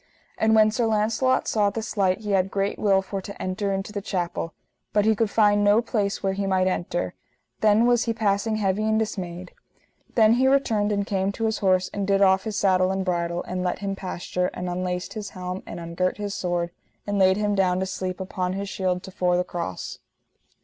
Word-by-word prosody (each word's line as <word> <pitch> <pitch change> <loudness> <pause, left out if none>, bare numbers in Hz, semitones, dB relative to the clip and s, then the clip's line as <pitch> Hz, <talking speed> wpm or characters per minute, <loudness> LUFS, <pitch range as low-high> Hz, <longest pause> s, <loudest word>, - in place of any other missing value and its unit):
And 220 0 +3
when 215 0 +5
Sir 230 +1 0
Launcelot 220 +4 +1
saw 210 -2 +2
this 220 +1 -5
light 195 0 +2
he 210 -1 -3
had 190 -1 +2
great 195 +1 -1
will 195 -2 +3
for 195 0 -4
to 200 +1 -9
enter 190 +2 -2
into 195 +2 -3
the 205 - -3
chapel, 175 -4 -3 0.4
but 210 0 +3
he 220 0 +4
could 220 0 +1
find 205 -1 +3
no 205 +2 +5
place 215 -4 -1
where 195 0 +1
he 195 0 -2
might 190 -1 +2
enter; 175 -1 -1 0.5
then 215 +2 +4
was 240 -1 +3
he 230 - 0
passing 215 0 0
heavy 200 -1 0
and 220 0 +2
dismayed. 185 -5 -4 0.6
Then 220 -1 +6
he 255 +2 +3
returned 225 -6 +2
and 200 -1 0
came 195 -1 0
to 225 - -2
his 220 0 0
horse 185 -2 +2
and 200 -1 -2
did 200 0 +3
off 190 +1 +4
his 215 -2 -3
saddle 185 -2 +3
and 190 0 -1
bridle, 170 -1 -1
and 180 0 -4
let 180 - -1
him 195 0 -3
pasture, 180 -1 -3
and 180 - -4
unlaced 180 0 -3
his 210 -2 -5
helm, 180 0 -5
and - - -6
ungirt 170 +2 -2
his 205 -1 -4
sword, 175 -2 -2 0.3
and 205 -1 -1
laid 190 0 +5
him 210 -1 0
down 185 -2 +2
to 190 - 0
sleep 185 0 -4
upon 185 -1 -2
his 200 +1 -3
shield 185 -1 -1
to 190 - -9
fore 180 -1 +1
the 180 - +1
cross. 170 - -5
195 Hz, 215 wpm, -25 LUFS, 185-210 Hz, 0.6 s, Then